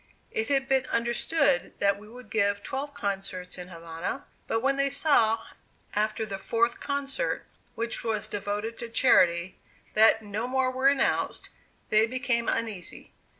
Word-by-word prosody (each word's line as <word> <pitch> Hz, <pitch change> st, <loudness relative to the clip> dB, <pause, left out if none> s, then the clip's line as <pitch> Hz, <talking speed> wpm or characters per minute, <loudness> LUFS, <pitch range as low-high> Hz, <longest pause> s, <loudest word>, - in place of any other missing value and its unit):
It 445 Hz, -1 st, -1 dB
had 270 Hz, -1 st, +2 dB
been 265 Hz, -1 st, +2 dB
understood 235 Hz, -, +1 dB
that 200 Hz, 0 st, +2 dB
we 210 Hz, -, -13 dB
would 240 Hz, 0 st, -13 dB
give 200 Hz, -2 st, +1 dB
twelve 280 Hz, +2 st, -4 dB
concerts 195 Hz, -5 st, -3 dB
in 180 Hz, -, -7 dB
Havana; 165 Hz, -2 st, -5 dB, 0.2 s
but 225 Hz, -, 0 dB
when 270 Hz, +2 st, +2 dB
they 275 Hz, 0 st, +2 dB
saw, 230 Hz, -7 st, +3 dB, 0.5 s
after 215 Hz, +1 st, 0 dB
the 195 Hz, -2 st, -5 dB
fourth 235 Hz, +4 st, +1 dB
concert, 280 Hz, -1 st, -2 dB, 0.3 s
which 230 Hz, +1 st, -3 dB
was 220 Hz, -2 st, -1 dB
devoted 205 Hz, +3 st, -3 dB
to 235 Hz, -, -5 dB
charity, 185 Hz, -7 st, +3 dB, 0.3 s
that 220 Hz, +1 st, +5 dB
no 210 Hz, +3 st, -3 dB
more 260 Hz, 0 st, +1 dB
were 260 Hz, +1 st, +2 dB
announced, 275 Hz, -1 st, +1 dB, 0.4 s
they 215 Hz, +1 st, +5 dB
became 250 Hz, -1 st, 0 dB
uneasy. 215 Hz, -6 st, -3 dB
225 Hz, 150 wpm, -28 LUFS, 205-260 Hz, 0.5 s, that